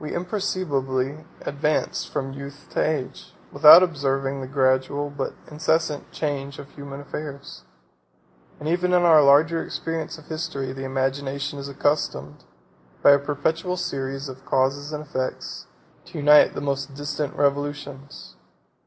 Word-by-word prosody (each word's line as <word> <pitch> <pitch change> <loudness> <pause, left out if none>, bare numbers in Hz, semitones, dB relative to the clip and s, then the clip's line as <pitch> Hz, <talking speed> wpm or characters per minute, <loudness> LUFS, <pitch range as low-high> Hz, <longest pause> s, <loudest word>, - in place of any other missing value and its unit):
We 150 - -4
imperceptibly 155 -7 -2 0.2
advance 150 +2 -1
from 135 0 -4
youth 140 +1 -9
to - - +1
age, 150 -4 -3 0.2
without 160 +4 +9
observing 135 -4 -1
the 130 - -6
gradual, 130 +1 +1
but 145 - -4 0.2
incessant, 155 0 -1
change 140 -2 -3
of 140 - -10
human 140 -1 -9
affairs; 140 0 -8 0.9
and 150 - -6
even 180 +2 +1
in 180 -1 +4
our 160 -3 +7
larger 155 +4 +5
experience 165 -1 -4
of 160 - -15
history, 155 -5 -4
the 135 0 -6
imagination 135 +2 -2
is 140 0 -6
accustomed, 140 - -2 0.6
by - - +8
a 140 - +6
perpetual 155 +6 -1
series 135 -3 -3
of 130 0 -10
causes 135 +3 0
and 150 0 -4
effects, 130 -3 -4 0.4
to 170 -1 -10
unite 150 0 +6
the - - -3
most 140 0 -3
distant 145 0 -3
revolutions. 145 -1 -3
145 Hz, 135 wpm, -24 LUFS, 135-155 Hz, 0.9 s, without